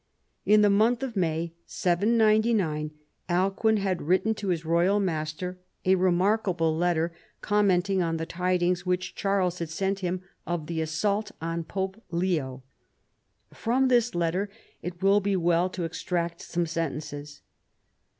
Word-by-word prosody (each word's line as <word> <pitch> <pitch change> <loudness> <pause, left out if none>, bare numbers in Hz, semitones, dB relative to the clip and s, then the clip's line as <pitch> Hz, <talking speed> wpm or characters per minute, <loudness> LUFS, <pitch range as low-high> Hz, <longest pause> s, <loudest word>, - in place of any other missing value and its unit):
In 210 +1 +6
the 205 - +5
month 225 +5 +3
of 250 -4 -4
May 165 -2 -1
(799) 210 -4 +2 0.4
Alcuin 195 +5 +2
had 195 -3 -1
written 185 +7 +2
to 215 -2 -6
his 170 -3 -1
royal 175 +5 +3
master 180 0 -3 0.3
a 185 - +5
remarkable 185 -2 +2
letter, 170 0 +1 0.3
commenting 195 -2 +2
on 165 -1 0
the 160 - -3
tidings 180 0 0
which 180 0 -1
Charles 190 -3 0
had 170 -2 -3
sent 195 +4 -1
him 180 0 -2 0.2
of 175 -3 -2
the 160 0 -2
assault 200 +7 -1
on 165 +1 -3
Pope 190 +5 -4
Leo. 165 -7 -1 0.9
From 255 +3 +1
this 240 -4 +3
letter 175 +4 0 0.3
it 175 +1 -6
will 200 +1 +5
be 200 -1 0
well 175 0 +2
to 185 -1 -4
extract 170 0 -2
some 175 0 -1
sentences. 150 -2 -4
180 Hz, 140 wpm, -27 LUFS, 165-200 Hz, 0.9 s, In